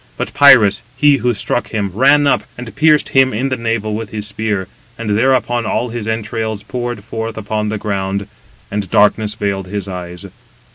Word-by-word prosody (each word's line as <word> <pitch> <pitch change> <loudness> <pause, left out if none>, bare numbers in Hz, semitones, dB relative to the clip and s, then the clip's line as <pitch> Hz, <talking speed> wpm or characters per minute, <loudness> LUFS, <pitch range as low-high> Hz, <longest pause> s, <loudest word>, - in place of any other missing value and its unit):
But - - -4
Pirus, 115 -8 +6 0.2
he 145 -1 +5
who 120 -2 0
struck 120 - -1
him, 100 -3 -2
ran 140 +6 +4
up, 140 - +3 0.2
and 120 -1 -8
pierced 155 -1 +3
him 130 -1 +3
in 130 +5 -1
the 130 - 0
navel 115 -2 -2
with 110 0 -4
his 105 -1 -5
spear; 105 -2 -2 0.3
and 115 -2 -3
thereupon 120 -1 +1
all 120 - -1
his 115 -2 -5
entrails 110 -1 -3
poured 120 -2 -5
forth 110 0 -5
upon 105 0 -2
the 110 - -2
ground, 100 -1 -2 0.5
and 100 -2 -3
darkness 105 +1 +2
veiled 100 -3 -2
his 100 +1 -4
eyes. 90 -1 -7
110 Hz, 180 wpm, -16 LUFS, 100-120 Hz, 0.5 s, Pirus